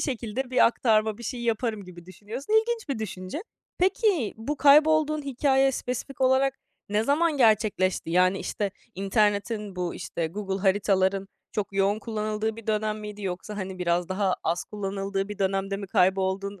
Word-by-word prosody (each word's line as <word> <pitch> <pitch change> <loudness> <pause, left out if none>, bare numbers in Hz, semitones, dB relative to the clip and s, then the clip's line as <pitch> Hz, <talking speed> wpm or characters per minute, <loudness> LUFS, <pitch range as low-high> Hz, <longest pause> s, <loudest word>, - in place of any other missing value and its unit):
şekilde 250 -1 -3
bir 255 - +5
aktarma, 220 -2 +2
bir - - -10
şey 245 0 -4
yaparım." 225 -2 -1
gibi 175 -1 -12
düşünüyorsun. 220 - -7
İlginç 450 -3 +2
bir 265 -5 -2
düşünce. 190 - -5 0.4
Peki 370 - +2
bu 260 +7 -3
kaybolduğun 305 +1 +5
hikâye 270 0 +2
spesifik 250 +2 -5
olarak 265 +1 +3 0.3
ne 210 +2 +1
zaman 305 +3 +2
gerçekleşti? 215 -7 +2
Yani, 185 +2 +3
işte, 205 -2 -2 0.2
internetin, 205 +1 0
bu, 180 -1 -2
işte, 165 - -3
Google 195 +3 -4
Haritaların 195 0 +2 0.2
çok 205 -2 -3
yoğun 195 +2 +2
kullanıldığı 215 0 -2
bir 230 -1 -11
dönem 215 0 -1
miydi? 210 0 -8
Yoksa, 190 +2 -4
hani, 190 -2 -5
biraz 175 -1 0
daha 190 -1 +1
az 170 +2 0
kullanıldığı 195 -1 -3
bir 210 -1 -7
dönemde 195 0 0
mi 200 0 -6
kayboldun? 190 +1 +1
210 Hz, 155 wpm, -26 LUFS, 195-250 Hz, 0.4 s, bir